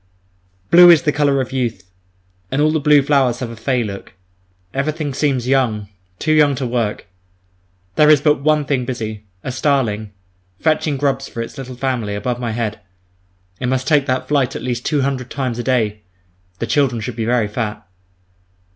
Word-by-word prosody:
Blue 175 +1 +9
is 165 -4 +6
the 150 - +2
colour 145 -2 +2
of 130 - -5
youth, 120 -8 -2 0.7
and 135 - -1
all 155 +1 +3
the 155 - +1
blue 145 -1 +5
flowers 135 -4 +2
have 125 -2 -5
a - - -8
"fey" 120 +2 0
look. 100 -3 -7 0.6
Everything 150 +1 -2
seems 130 -3 0
young 115 -7 +1 0.3
too 155 - -1
young 150 -2 +4
to 130 - -3
work. 120 -3 -2 0.9
There 150 0 +6
is 150 -2 +7
but 150 -1 +2
one 150 0 +2
thing 135 -2 0
busy, 110 -4 -5 0.2
a 130 - -3
starling, 120 -6 0 0.5
fetching 155 -2 +1
grubs 135 -1 -1
for - - -8
its 115 - -10
little 130 -3 -7
family, 120 -5 -2
above 120 +4 -3
my 120 -2 -3
head—it 95 -2 -7
must 130 +1 -1
take 145 -3 +3
that 130 -1 -1
flight 135 -3 +1
at - - -5
least 125 -1 -3
two 150 -3 +1
hundred 130 -2 -2
times 130 -4 -3
a - - -2
day. 110 -5 0 0.6
The 115 - -2
children 130 -2 +1
should 110 +2 -5
be 115 -1 -2
very 120 -2 +1
fat. 105 -2 -4
130 Hz, 180 wpm, -18 LUFS, 115-140 Hz, 0.9 s, Blue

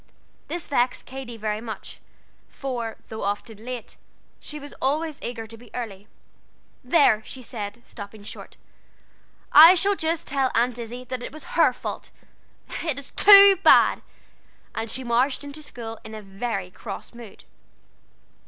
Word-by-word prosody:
This 345 -2 -4
vexed 250 -2 0
Katy 255 -3 -8
very 215 0 -3
much; 220 -3 -8 0.5
for, 240 -5 -5
though 220 - -6
often 205 +2 -4
late, 245 -2 -7 0.4
she 300 - -6
was 285 0 -10
always 300 +3 -1
eager 235 -2 -5
to 225 +1 -11
be 240 0 -16
early. 210 -5 -6 0.8
"There," 250 -5 +4
she 255 +2 -8
said, 220 -1 -7
stopping 205 -1 -10
short, - - -9 0.9
"I 330 +5 +10
shall 400 +3 +3
just 325 -2 -1
tell 270 -2 0
Aunt 240 +1 +1
Izzie 240 +2 -7
that 255 0 -5
it - - -6
was 310 +2 -10
her - - +5
fault. - - -7 0.7
It 315 -5 -1
is 280 - -7
too 400 -1 +9
bad." - - +6 0.7
And 225 0 -4
she 260 - -4
marched 250 +4 +1
into 285 +2 -8
school 230 -6 -8
in 220 0 -9
a 215 - -9
very 195 -1 -4
cross 200 +4 -8
mood. 235 -4 -12
245 Hz, 150 wpm, -24 LUFS, 220-280 Hz, 0.9 s, I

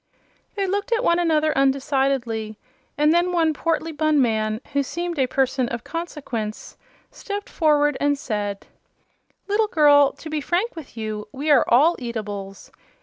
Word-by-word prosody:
They 400 -1 0
looked 405 +5 -2
at 465 +1 +1
one 340 -5 +3
another 315 -2 +2
undecidedly, 265 -5 0 0.4
and 300 +2 +4
then 350 +1 +2
one 325 -3 +2
portly 330 +1 -1
bun 310 -1 +1
man, 220 -3 +1
who 280 - +2
seemed 340 +3 -4
a 260 - +3
person 260 -1 0
of 235 -1 -5
consequence, 275 -10 -5 0.4
stepped 405 0 -6
forward 295 -3 +2
and 285 0 +2
said: 205 -7 -4 0.8
"Little 420 +2 +2
girl, 290 -5 +5
to - - -11
be 310 -1 -2
frank 370 - -1
with 295 -8 -11
you, 215 -1 -4
we 290 +3 -1
are 275 -5 +5
all 300 +9 +5
eatables. 205 -5 -6
290 Hz, 150 wpm, -22 LUFS, 235-330 Hz, 0.8 s, girl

